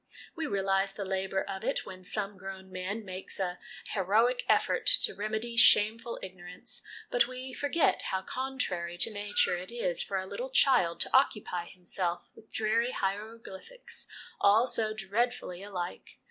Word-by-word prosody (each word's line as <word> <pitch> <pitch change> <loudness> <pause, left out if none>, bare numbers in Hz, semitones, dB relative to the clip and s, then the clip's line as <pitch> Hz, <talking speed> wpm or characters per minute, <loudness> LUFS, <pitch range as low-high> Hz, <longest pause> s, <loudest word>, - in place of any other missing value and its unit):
We 325 -3 -3
realise 195 0 +1
the 200 - -5
labour 190 0 -1
of 190 0 -5
it - - -1
when 185 -1 -10
some 205 +2 -2
grown 190 0 -9
man 190 +4 -4
makes 185 +1 -4
a 180 -2 -2 0.3
heroic 220 +6 +2
effort - - +2
to 450 - +8
remedy 220 +3 -3
shameful 230 +1 +5
ignorance, 185 +7 -7 0.3
but 240 -1 +4
we 255 +1 -7
forget 290 +4 +1
how 190 0 -1
contrary 195 -11 -3
to 220 +5 +6
Nature 205 -3 +1
it 185 - -8
is 235 -7 -1
for 195 - -2
a 190 - -3
little - - -5
child 220 - +3
to - - +2
occupy 205 -9 +1
himself 175 -1 -3
with 220 - -19
dreary 230 +3 +1
hieroglyphics 215 - -4 0.3
all 210 +4 +5
so 220 -4 +1
dreadfully 205 -2 -2
alike 180 - -6
200 Hz, 150 wpm, -30 LUFS, 190-235 Hz, 0.3 s, to